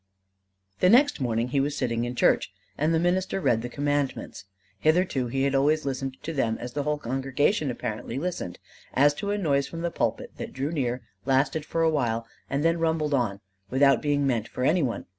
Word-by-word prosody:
The 180 - +5
next 260 - +5
morning 120 -1 0
he 140 - +1
was 145 +2 0
sitting 120 -2 0
in 120 +1 -4
church; - - +3 0.2
and 155 +3 +1
the 165 - +3
minister 185 +3 +1
read 115 -11 +2
the 120 - -5
Commandments. 145 -5 -2 0.3
Hitherto 155 - +2
he 135 +3 -1
had 140 0 +1
always 150 +3 +2
listened 135 -1 -3
to 165 - -4
them 115 -6 0
as 120 0 -6
the 145 - -1
whole 150 +1 0
congregation 135 - 0
apparently 115 0 -4
listened: 165 - -3 0.4
as 145 +2 +5
to 200 +7 -4
a 205 - 0
noise 140 -8 +1
from 165 - -6
the 170 0 -1
pulpit - - -2
that - - -6
drew 135 +3 -2
near, 125 -5 -1 0.2
lasted 135 +3 +2
for 165 +1 0
a 165 - +4
while, 115 -6 0 0.2
and 140 +3 -1
then 165 0 +3
rumbled 160 -2 0
on 110 -7 0 0.3
without 135 -1 +4
being 145 -1 +1
meant 120 -4 0
for 125 - -4
any 165 +6 +3
one. 125 -5 -2
140 Hz, 200 wpm, -26 LUFS, 125-155 Hz, 0.4 s, The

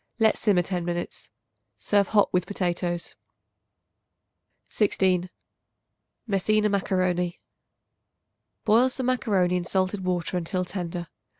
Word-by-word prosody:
Let 220 -2 +4
simmer 195 -5 +2
ten 180 -1 -3
minutes. 175 0 -4 0.5
Serve 200 -2 +2
hot 210 -2 +3
with 180 -1 +1
potatoes. 175 -3 -2 1.5
16. 185 -4 +1 1.0
Messina 210 0 +2
Macaroni. 185 -3 0 1.3
Boil 230 +4 +5
some 260 0 -2
macaroni 200 -8 +1
in 180 - -2
salted 190 +2 -1
water 180 -1 -1
until 180 +1 -2
tender. 175 -2 -5
185 Hz, 100 wpm, -26 LUFS, 180-205 Hz, 1.5 s, Boil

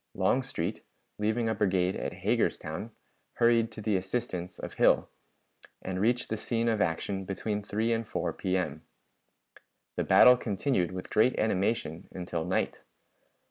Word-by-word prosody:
Longstreet, 125 -10 0 0.4
leaving 110 +2 +1
a 110 - +1
brigade 95 -3 +1
at - - -3
Hagerstown, 105 +6 -1 0.4
hurried 115 -1 +3
to 110 - -7
the 105 -2 +1
assistance 95 -2 -3
of - - -7
Hill, - - +3 0.7
and 95 0 -4
reached 120 +3 +1
the 110 - -1
scene 115 +2 -1
of 110 -3 +1
action 95 +4 -1
between 105 +2 -3
3 110 +3 0
and 115 -1 -2
4 - - -2
P.M. 95 -1 -2 1.2
The - - +1
battle 125 0 +7
continued 105 -4 0
with 90 0 -7
great 110 +4 +3
animation 95 -5 0
until 90 -3 -3
night. 90 - -1
105 Hz, 140 wpm, -29 LUFS, 95-115 Hz, 1.2 s, battle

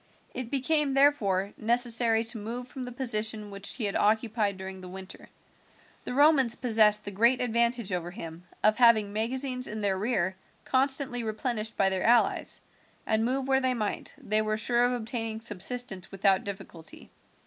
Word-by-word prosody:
It 255 -2 -4
became, 280 +1 +1
therefore, 205 -9 +2
necessary 230 0 +2
to 230 0 -1
move 235 +4 -6
from 255 -1 -7
the 250 - -7
position 220 -4 -2
which 200 0 -4
he 245 - -5
had 200 -1 -1
occupied 215 -2 +1
during 190 0 -8
the 185 - -9
winter. 190 +1 -10 0.8
The 250 - -4
Romans 280 -5 +4
possessed 215 -3 +3
the 205 - -5
great 235 +6 +3
advantage 235 -3 0
over 175 -1 -3
him 170 -3 -9 0.2
of 215 0 +4
having 225 -4 +4
magazines 255 +3 -2
in 215 0 -5
their 200 -2 +1
rear 190 -4 -1 0.3
constantly 265 -2 +2
replenished 225 0 -3
by 195 -1 +3
their 190 -1 -2
allies, 235 +1 +2 0.4
and 220 0 +1
move 260 +3 -1
where 265 0 +2
they 260 -1 +1
might, 215 -3 -4
they 215 +1 +1
were 215 0 -1
sure 240 +2 +2
of 245 - +1
obtaining 225 -2 -4
subsistence 210 -2 -1
without 195 -1 +2
difficulty. 190 -5 -9
225 Hz, 165 wpm, -28 LUFS, 205-250 Hz, 0.8 s, Romans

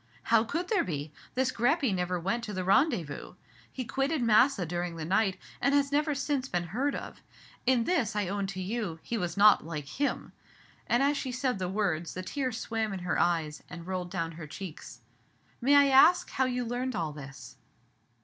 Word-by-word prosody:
"How 225 -1 +6
could 335 +10 -3
there 430 - +2
be? 150 -3 -4 0.2
This 260 0 +1
Greppi 260 - +2
never 180 -1 -1
went 195 +8 -1
to 210 - -6
the 185 -1 -2
rendezvous. 195 - +1 0.4
He 255 - -5
quitted 270 +3 0
Massa 230 -2 +4
during 175 +1 -3
the 160 -1 -5
night, 190 +2 +1 0.2
and 280 +3 +3
has 280 0 +2
never 295 +1 +1
since 275 -1 -1
been 175 -2 -1
heard 275 +5 0
of. - - -8 0.5
In 255 -2 +4
this, 255 -7 0
I 205 -3 0
own 200 +1 -2
to 190 -1 -6
you, 195 -3 -3
he 235 - -3
was 175 -4 -2
not 205 0 +6
like 155 -2 -5
him." 280 - -2 0.5
And, 240 +3 +3
as 285 +1 +2
she 260 - -3
said 250 -3 -1
the 180 -1 -2
words, 180 -5 -1
the 185 - -4
tears 255 +1 -2
swam 220 -2 -2
in 190 - -5
her 175 0 -1
eyes, 160 -3 0
and 170 -2 -8
rolled 180 -1 -3
down 165 -3 -3
her 160 -1 -9
cheeks. 155 -8 -9 0.6
"May 275 +4 +4
I 285 -1 +6
ask 275 +7 +6
you - - -13
how 260 - +2
you 250 -1 -1
learned 245 +1 -2
all 165 -4 -2
this?" 140 -2 -10
210 Hz, 200 wpm, -29 LUFS, 175-260 Hz, 0.6 s, How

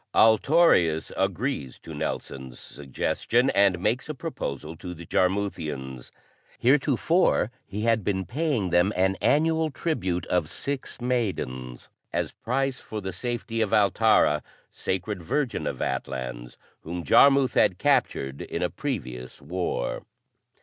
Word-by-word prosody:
Altorius 110 - +4
agrees 95 - -2
to - - -10
Nelson's 65 -2 -5
suggestion 115 - -1
and 100 -2 +4
makes 110 - -1
a 155 - -3
proposal 80 - -5
to 90 +1 -7
the 85 +1 -10
Jarmuthians. 80 -10 -1 0.5
Heretofore 140 - +3 0.2
he 100 +2 -5
had 115 -1 +2
been 95 -1 -1
paying 125 - -1
them 90 +3 +4
an 95 +1 +2
annual 160 +1 +3
tribute 95 - -2
of 85 -3 0
six 140 -2 -5
maidens, 95 - -3 0.2
as - - -1
price 135 +2 -1
for 110 - -6
the 95 -2 -5
safety 115 +2 -3
of 110 - +2
Altara, 105 -7 +4 0.3
Sacred 95 +1 -3
Virgin 130 - -1
of - - -3
Atlans, 60 -2 -4 0.2
whom 85 +2 -6
Jarmuth 135 - +5
had - - +3
captured 70 +1 +1
in - - -3
a - - 0
previous 60 0 -5
war. 90 -8 -3
95 Hz, 125 wpm, -26 LUFS, 80-125 Hz, 0.5 s, Jarmuth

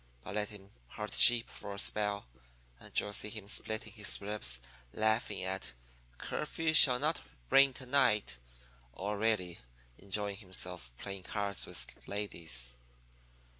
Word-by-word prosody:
But 105 - -7
let 105 0 -2
him 100 -1 -12 0.2
herd - - -7
sheep 120 -1 +9
for 100 -1 -9
a - - -10
spell, 105 - +2 0.5
and - - 0
you'll 105 - -2
see 105 - +3
him 105 -2 -9
splitting 110 0 -4
his 105 -3 -2
ribs 100 -13 -3 0.3
laughing 110 +1 0
at 65 0 -4 0.4
'Curfew 160 - -2
Shall 135 -5 +7
Not 150 +4 0 0.3
Ring 135 0 +6
To 130 - -9
night,' 125 - +2 0.6
or 100 +5 -4
really 105 -6 0 0.4
enjoying 100 +1 -3
himself 90 - -4
playing 100 +5 -7
cards 100 0 -1
with - - -2
ladies. 80 -12 -3
105 Hz, 135 wpm, -33 LUFS, 95-110 Hz, 0.6 s, sheep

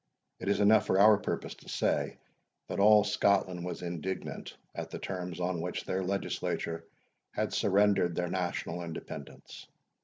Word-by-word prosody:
It 95 - -3
is 100 - +2
enough 105 +1 +5
for 95 - +3
our 105 0 +7
purpose - - -3
to - - -15
say, - - 0 0.5
that 90 - -3
all 105 +1 +7
Scotland 100 -3 +2
was 90 0 -5
indignant 90 +2 -5 0.2
at - - -5
the - - -5
terms 90 -2 -5
on 90 -1 -1
which 90 +1 -4
their 95 - -1
legislature 90 -3 -2 0.5
had - - -1
surrendered 100 -3 +3
their 90 0 0
national 90 -1 -2
independence. 80 -4 -8
95 Hz, 150 wpm, -31 LUFS, 90-100 Hz, 0.5 s, our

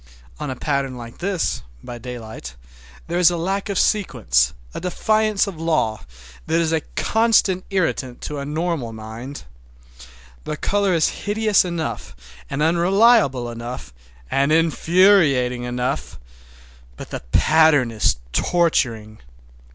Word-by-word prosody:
On 150 - -4
a 130 - -3
pattern 135 -1 -2
like 115 -1 -10
this, 185 -1 -1 0.2
by 120 -1 -8
daylight, 110 - -8 0.5
there 175 +1 -1
is 180 - +6
a 175 - -2
lack 195 +5 -2
of 200 - -2
sequence, 110 - +2 0.2
a - - -6
defiance 215 +3 +1
of 185 -6 -7
law, 155 -10 0 0.5
that 165 +1 +2
is 165 -1 +1
a 160 -1 +1
constant 220 -5 +2
irritant 160 -10 -1
to 150 -1 -5
a - - -4
normal 150 -5 -2
mind. 110 +5 -8 1.0
The 150 - -4
color 200 0 +1
is 160 - +3 0.2
hideous 215 -1 +3
enough, 160 - -4 0.3
and 140 +2 -1
unreliable 175 - +3
enough, 115 - -7 0.4
and 140 +2 +2
infuriating 160 -6 +3
enough, 125 - -3 0.8
but - - -9
the - - -4
pattern 155 -6 +4
is 110 -2 +2 0.2
torturing. 115 -11 0
155 Hz, 130 wpm, -21 LUFS, 125-180 Hz, 1.0 s, is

